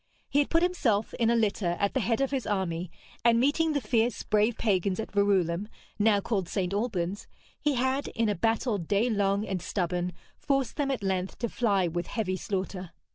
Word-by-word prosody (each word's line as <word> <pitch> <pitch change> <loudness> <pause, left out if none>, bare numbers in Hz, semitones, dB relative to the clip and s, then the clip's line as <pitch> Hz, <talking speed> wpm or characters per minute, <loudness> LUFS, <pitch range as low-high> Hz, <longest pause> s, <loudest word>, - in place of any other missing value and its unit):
He 285 - +2
had 290 - +2
put 330 +1 +3
himself, 240 - +1
in 230 -1 +3
a 235 - +3
litter, 200 -6 +1
at 200 - +1
the - - +1
head 230 +2 0
of 275 - +1
his 265 -5 -2
army, 180 -4 -1 0.3
and 230 0 +5
meeting 305 +5 +2
the 285 - +1
fierce, 235 -2 +1
brave 215 +2 +2
pagans 195 -3 +1
at 220 - -4
Verulam 200 -2 +2 0.3
(now 210 -1 +4
called 195 -4 -2
St. 190 -1 -1
Albans) 200 -3 -2 0.3
he 295 -2 +1
had, 260 +3 0
in 230 -1 +1
a 210 - +2
battle 225 +2 0
day 205 +8 +1
long 200 0 +1
and 190 -4 -3
stubborn, 180 -1 -2 0.3
forced 275 -4 0
them 285 -2 0
at 260 -6 -2
length 190 -1 -1
to 235 - -2
fly 200 -7 +1
with 175 +1 -3
heavy 195 -5 -2
slaughter. 185 -1 -4
210 Hz, 195 wpm, -28 LUFS, 190-240 Hz, 0.3 s, and